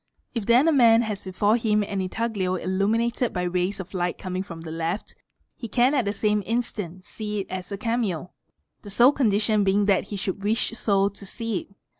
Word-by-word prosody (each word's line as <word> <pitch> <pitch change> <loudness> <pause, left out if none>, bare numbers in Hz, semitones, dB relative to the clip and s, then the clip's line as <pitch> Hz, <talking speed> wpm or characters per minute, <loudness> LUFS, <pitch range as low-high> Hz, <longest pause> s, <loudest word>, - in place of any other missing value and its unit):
If 230 -5 -3
then 245 +6 +5
a - - +5
man 235 -5 +6
has 210 -3 -4
before 205 +4 +2
him 210 -2 +1
an 200 -1 -3
intaglio 190 -1 -1
illuminated 220 +7 0
by 180 - -1
rays 180 +2 -1
o 190 - -4
light 175 -1 -1
coming 185 0 -4
from 170 -4 -8
the 160 -1 -7
left, 165 +5 -3 0.4
he 230 - -7
can 245 +6 +3
at 260 -6 +2
the 200 - 0
same 210 0 +1
instant 205 -6 -3
see 210 -1 -4
it - - -10
as 185 +1 -5
a 200 - -3
cameo 210 -7 -2 0.5
the 205 - -10
sole 240 +7 +6
condition 215 -5 +2
being 200 +1 +2
that 195 -2 +2
he 205 - -6
should 195 0 -3
wish 220 +3 +1
so 200 -4 +2
to 200 0 -12
see 225 +1 -3
it. 200 - -15
205 Hz, 205 wpm, -25 LUFS, 185-230 Hz, 0.5 s, man